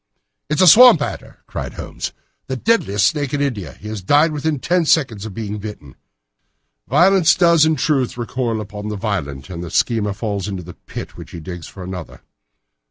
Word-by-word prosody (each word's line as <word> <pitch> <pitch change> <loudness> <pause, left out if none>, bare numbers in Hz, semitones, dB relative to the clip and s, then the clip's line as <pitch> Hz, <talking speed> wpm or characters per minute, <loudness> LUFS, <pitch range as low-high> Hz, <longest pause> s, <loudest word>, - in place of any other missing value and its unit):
"It 150 - +1
is 180 - +1
a - - +6
swamp 235 +1 +9
adder!" 145 - -6
cried - - -6
Holmes; - - -6 0.4
"the 130 - -3
deadliest 120 - +1
snake 145 +5 0
in 145 - -1
India. 105 - -3
He 105 - -12
has 110 -2 -5
died 145 - +3
within 150 0 -1
ten 175 +6 +1
seconds 120 -10 +1
of 100 - -10
being 105 -2 -4
bitten. 100 -10 -9 0.9
Violence 185 -2 +4
does, 170 -3 +5
in 160 - +2
truth, 140 -6 0
recoil 120 -2 -2
upon 105 0 -7
the 105 - -3
violent, 75 - -4
and 85 -1 -6
the 85 - -6
schemer 105 +2 +1
falls 100 -2 -3
into 95 -3 -5
the 90 +1 -10
pit - - -9
which - - -10
he 85 - -8
digs 90 0 -8
for 95 - -10
another. 90 -2 -8
110 Hz, 190 wpm, -19 LUFS, 95-150 Hz, 0.9 s, swamp